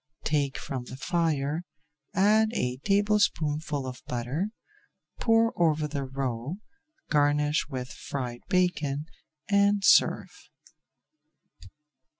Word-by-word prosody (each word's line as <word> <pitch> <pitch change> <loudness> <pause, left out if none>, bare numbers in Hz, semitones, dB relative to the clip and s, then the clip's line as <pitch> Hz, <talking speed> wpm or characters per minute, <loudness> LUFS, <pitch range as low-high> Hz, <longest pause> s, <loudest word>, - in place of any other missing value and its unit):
Take 145 -3 0
from 130 -2 -5
the 130 - -9
fire, 155 0 0 0.5
add 215 +3 +4
a 125 - -1
tablespoonful 160 -6 +1
of 130 0 -7
butter, 125 - -2 0.7
pour 230 0 +3
over 155 -3 +2
the 140 -2 -3
roe, 130 +2 -3 0.6
garnish 150 0 +2
with 130 -2 -5
fried 125 -3 -5
bacon, 155 -6 +1 0.4
and 200 0 +3
serve. - - +3
150 Hz, 95 wpm, -27 LUFS, 135-185 Hz, 0.7 s, add